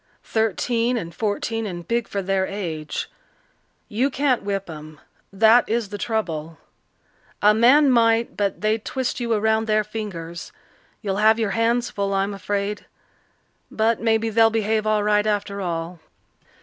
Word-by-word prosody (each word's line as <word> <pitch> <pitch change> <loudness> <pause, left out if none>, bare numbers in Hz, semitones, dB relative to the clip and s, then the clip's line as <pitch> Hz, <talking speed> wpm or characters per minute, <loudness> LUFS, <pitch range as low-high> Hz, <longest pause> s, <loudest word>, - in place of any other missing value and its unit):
Thirteen 230 +3 0
and 170 -6 -5
fourteen 220 +3 -2
and 175 -3 -7
big 235 0 0
for 200 -1 -3
their 190 0 0
age. 165 -7 -4 0.8
You 245 +6 0
can't 270 -2 +1
whip 195 -1 -3
'em 155 -2 -10 0.3
that 220 +4 +5
is 225 -2 -1
the 205 0 -6
trouble. 165 -8 -3 0.9
A 210 +1 +7
man 260 +6 +5
might, 230 -1 +3
but 200 -2 -1
they'd 215 +1 0
twist 260 -1 -3
you 235 -1 -2
around 220 +1 +1
their 215 0 +2
fingers. 190 -6 -7 0.5
You'll 195 -2 -1
have 220 +1 +4
your 220 -3 -1
hands 235 +1 +1
full, 200 -1 -2
I'm 195 +1 0
afraid. 200 +1 -3 0.8
But 220 +1 0
maybe 225 0 +1
they'll 225 +1 +5
behave 220 -1 0
all 215 -1 +2
right 210 0 +2
after 205 -1 -1
all." 170 -1 -4
215 Hz, 150 wpm, -22 LUFS, 195-225 Hz, 0.9 s, A